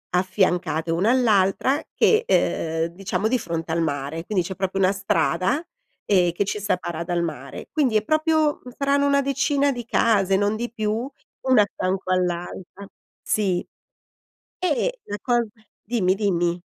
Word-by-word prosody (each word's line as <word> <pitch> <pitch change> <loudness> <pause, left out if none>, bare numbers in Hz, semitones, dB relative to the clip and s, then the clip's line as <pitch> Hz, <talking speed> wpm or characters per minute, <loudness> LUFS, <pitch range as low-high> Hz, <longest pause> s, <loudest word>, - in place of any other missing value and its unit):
affiancate 180 -3 +1
una 190 +8 +2
all'altra 235 +2 +2
che 450 +1 +4 0.7
uhm, 170 - -20
diciamo 195 +2 -1
di 255 +2 +2
fronte 165 -4 -4
al 170 - +1
mare, 145 +1 -2
quindi 185 -5 0
c'è 190 - -5
proprio 195 0 -2
una 190 +1 +4
strada, 185 - 0 0.4
ehm, 180 -4 +3
che 195 +4 -1
ci 210 - -3
separa 175 -4 -2
dal 175 0 -1
mare. 140 -5 -6
Quindi 260 -8 +2
è 210 - 0
proprio, 310 +1 +1
mhmm, 250 - -10
saranno 280 0 +2
una 280 0 +3
decina 275 +1 +1
di 240 -2 -6
case, 195 -5 +2
non 205 +2 +1
di 240 +1 -4
più, 215 -2 -2 0.6
una 255 -5 +6
accanto 185 -1 -3
all'altra, 180 +2 -3 0.3
sì. 190 -4 0 0.9
E 415 - 0
la 205 - -4
cos 240 -2 +2 0.4
dimmi, 200 -5 +1
dimmi. 175 -4 0
195 Hz, 150 wpm, -23 LUFS, 175-245 Hz, 0.9 s, una